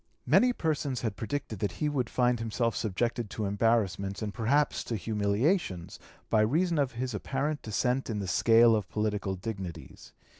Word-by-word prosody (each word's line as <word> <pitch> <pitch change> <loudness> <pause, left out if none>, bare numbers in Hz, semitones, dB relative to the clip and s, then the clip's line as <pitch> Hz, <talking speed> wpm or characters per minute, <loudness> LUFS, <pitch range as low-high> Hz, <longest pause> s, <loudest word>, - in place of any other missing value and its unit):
Many 250 +1 +5
persons 150 - -1
had 110 -4 -2
predicted 115 -1 -4
that 105 - -1
he 150 - -1
would 135 -5 -1
find 125 -1 +2
himself 115 +1 -1
subjected 115 +2 -1
to 110 - -3
embarrassments 100 -1 0
and 105 -1 -3
perhaps 130 +8 +1
to 115 - -2
humiliations 105 - 0 0.3
by 110 - +3
reason 160 +9 +2
of 135 -3 0
his 125 +1 -3
apparent 135 +7 -2
descent 125 +5 -1
in 110 - -2
the 100 -2 -3
scale 115 +4 +5
of 105 -4 -2
political 105 -2 -1
dignities. 95 -4 -7
115 Hz, 160 wpm, -29 LUFS, 105-130 Hz, 0.3 s, Many